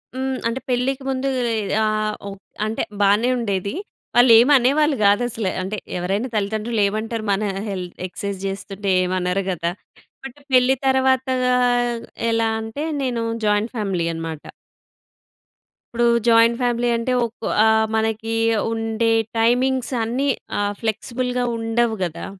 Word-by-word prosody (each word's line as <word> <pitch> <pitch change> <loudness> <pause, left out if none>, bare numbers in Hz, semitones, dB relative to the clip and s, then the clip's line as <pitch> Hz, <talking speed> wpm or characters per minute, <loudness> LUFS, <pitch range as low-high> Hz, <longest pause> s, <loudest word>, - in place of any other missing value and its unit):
హ్మ్. 265 0 -2
అంటే, 230 +3 -2
పెళ్ళికి 260 +2 0
ముందూ 265 0 -1 0.3
ఈ - - 0 0.3
ఆహ్, 215 0 0
ఒ - - -4 0.4
అంటే, 220 +1 -2 0.2
బానే 205 +5 +4
ఉండేది. 200 -3 -2 0.4
వాళ్ళేమనేవాళ్ళు 260 +5 +5
గాదసల. 220 +1 +2 0.2
అంటే, 200 +3 -4 0.2
ఎవరైనా 195 +8 -2
తల్లితండ్రులేమంటారు, 215 +1 -1
మనా 200 +1 0 0.2
హెల్ 185 -2 -4 0.2
ఎక్సైజ్ 200 +1 -5
జేస్తుంటే, 195 0 -3
ఏమనరు 180 +1 -1
గదా! 170 -1 -2 0.5
బట్ 270 +2 -9
పెళ్లి 255 +1 +5
తర్వాతా 260 0 +2 1.0
ఎలా 225 0 +1
అంటే, 225 +7 -5 0.2
నేను 245 -3 -1 0.2
జాయింట్ 210 +3 +1
ఫ్యామిలీ 195 -6 -1
అనమాట. 165 -2 -6 1.5
ఇప్పుడు 240 0 +2 0.2
జాయింట్ 230 0 +5
ఫ్యామిలీ 240 0 +1
అంటే, 230 +2 -1
ఒక 230 0 -6 0.2
ఆహ్, 220 0 +4
మనకి 220 0 -1 0.4
ఉండే 225 0 0 0.3
టైమింగ్స్ 250 +3 +1
అన్నీ 250 +5 -1 0.3
ఆహ్, 205 0 0
ఫ్లెక్స్‌బుల్‌గా 245 +3 -2
ఉండవు 225 0 0
గదా! 170 -3 -4
225 Hz, 120 wpm, -21 LUFS, 205-245 Hz, 1.5 s, వాళ్ళేమనేవాళ్ళు